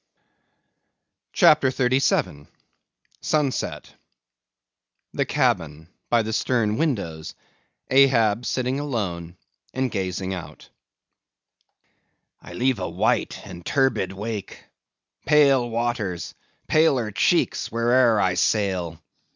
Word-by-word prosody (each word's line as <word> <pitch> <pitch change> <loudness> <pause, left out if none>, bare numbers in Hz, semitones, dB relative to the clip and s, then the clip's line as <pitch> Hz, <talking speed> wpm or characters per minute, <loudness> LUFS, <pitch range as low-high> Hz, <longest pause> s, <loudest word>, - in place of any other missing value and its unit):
CHAPTER 150 -3 +5
37. 130 - 0 0.7
Sunset. 150 -4 -2 1.2
The - - 0
cabin; 80 0 -1 0.2
by 115 -1 +3
the 110 +1 -4
stern 110 -3 0
windows; 95 - -3 0.5
Ahab 125 -4 +3
sitting 130 +1 -1
alone, 95 - -4 0.4
and 130 -2 -1
gazing 95 -1 -3
out. 90 -3 -9 1.7
I - - -12
leave 130 -2 0
a 90 - -3
white - - -1
and 90 -3 -10
turbid 135 -8 0
wake; 105 +1 -6 0.6
pale 140 -5 +4
waters, 115 -6 -3 0.3
paler 135 -8 +2
cheeks, 100 - +1
where'er 115 0 +3
I 95 -2 +2
sail. 90 -4 0
115 Hz, 90 wpm, -23 LUFS, 95-130 Hz, 1.7 s, CHAPTER